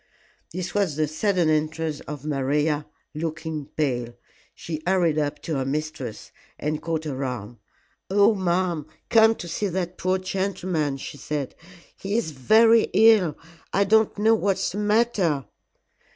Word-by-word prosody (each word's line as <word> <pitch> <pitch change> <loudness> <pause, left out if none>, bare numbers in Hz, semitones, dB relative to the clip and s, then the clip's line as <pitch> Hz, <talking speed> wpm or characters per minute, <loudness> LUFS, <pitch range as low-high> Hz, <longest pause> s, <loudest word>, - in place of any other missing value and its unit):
This 180 +1 -4
was 195 -8 +1
the 155 0 +1
sudden 175 +2 +1
entrance 155 0 0
of 150 -1 -8
Maria, 150 +1 0 0.3
looking 155 -1 -4
pale. 125 -6 -2 0.4
She 155 -2 -6
hurried 175 -5 +2
up 150 0 -1
to 160 -4 -2
her 135 - 0
mistress 140 -4 -4 0.3
and 150 +1 -2
caught 160 -1 -2
her 140 -3 -4
arm. 120 -3 -5 0.5
"Oh, 205 +3 +5
ma'am, 175 -5 0 0.2
come 225 0 +6
to 175 - -8
see 205 +5 -2
that 180 -1 -3
poor 185 +1 +1
gentleman," 185 -6 -2
she 140 - -8
said. 145 -3 -3 0.4
"He 200 +3 -2
is 230 -9 -1
very 220 - +5
ill 215 -9 +5 0.4
I 200 - +4
don't 220 +2 +3
know 220 +2 +4
what's 200 -3 0
the 200 - -4
matter." 210 - +1
160 Hz, 145 wpm, -24 LUFS, 150-195 Hz, 0.5 s, come